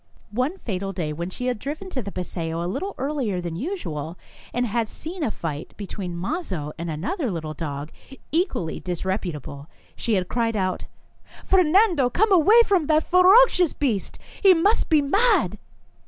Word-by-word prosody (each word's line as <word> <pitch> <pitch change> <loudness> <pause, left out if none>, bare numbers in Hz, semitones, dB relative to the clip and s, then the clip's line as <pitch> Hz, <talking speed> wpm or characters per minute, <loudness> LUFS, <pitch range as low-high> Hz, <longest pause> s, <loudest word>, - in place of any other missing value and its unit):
One 255 - -1
fatal 195 - -4
day, 160 -5 -3
when 170 +3 -4
she 250 +6 -5
had 250 -3 -1
driven 310 - -6
to 260 - -2
the 200 -2 -6
paseo 170 -2 -4
a - - -3
little 380 - -3
earlier 260 -9 -1
than 170 -2 -4
usual, 170 - -4 0.3
and 245 +1 0
had 230 -1 -1
seen 345 +3 -7
a 240 - +1
fight 155 -7 -6
between 190 -3 -5
Mazo 180 - -3
and 170 0 -4
another 225 - -2
little 160 -4 -4
dog, 145 -1 -5 0.4
equally 315 - -1
disreputable, 175 -6 -4 0.3
she 230 -3 0
had 185 -2 0
cried 230 -2 0
out: 185 -2 -1 0.6
€f - - -22
Fernando, 365 - +4
come 420 - +2
away 410 +6 +7
from 375 -6 +2
that 310 +1 +3
ferocious 365 -1 +5
beast! 230 -10 -1 0.2
He 385 -2 +7
must 400 +7 +2
be 310 -3 +4
mad 360 - +2
230 Hz, 165 wpm, -24 LUFS, -, 0.6 s, away